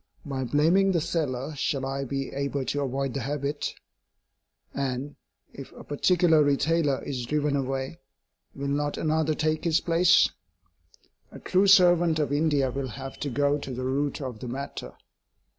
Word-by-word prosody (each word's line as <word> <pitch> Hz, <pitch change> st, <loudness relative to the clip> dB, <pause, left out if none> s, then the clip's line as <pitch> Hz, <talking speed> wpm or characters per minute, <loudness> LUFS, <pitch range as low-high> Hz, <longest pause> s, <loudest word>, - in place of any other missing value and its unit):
By 135 Hz, -2 st, -3 dB
blaming 170 Hz, +9 st, +3 dB
the 170 Hz, -, +2 dB
seller 150 Hz, -4 st, -2 dB
shall 135 Hz, -1 st, -1 dB
I 135 Hz, +1 st, -3 dB
be 135 Hz, +1 st, -3 dB
able 140 Hz, 0 st, -2 dB
to 145 Hz, -, -1 dB
avoid 135 Hz, -1 st, -2 dB
the 140 Hz, -, -2 dB
habit? 145 Hz, +1 st, -3 dB, 1.0 s
And, 135 Hz, +1 st, -3 dB, 0.4 s
if -, -, -10 dB
a -, -, -11 dB
particular 165 Hz, +1 st, +3 dB
retailer 145 Hz, 0 st, +1 dB
is 125 Hz, -4 st, -4 dB
driven 150 Hz, 0 st, 0 dB
away, 135 Hz, +3 st, -3 dB, 0.6 s
will 140 Hz, 0 st, -4 dB
not 145 Hz, +1 st, -1 dB
another 155 Hz, 0 st, +1 dB
take 155 Hz, 0 st, 0 dB
his 165 Hz, -1 st, +3 dB
place? 175 Hz, +1 st, +4 dB, 1.0 s
A -, -, -10 dB
true 190 Hz, +2 st, +2 dB
servant 175 Hz, -4 st, +5 dB
of 145 Hz, -2 st, 0 dB
India 145 Hz, -3 st, +2 dB
will 135 Hz, +1 st, -3 dB
have 135 Hz, +2 st, -8 dB
to 145 Hz, -, -3 dB
go 145 Hz, +3 st, +1 dB
to 135 Hz, -, -7 dB
the 130 Hz, 0 st, -4 dB
root 140 Hz, +3 st, -1 dB
of 125 Hz, -5 st, -5 dB
the 125 Hz, -, -7 dB
matter. 135 Hz, +3 st, -6 dB
145 Hz, 160 wpm, -26 LUFS, 135-155 Hz, 1.0 s, servant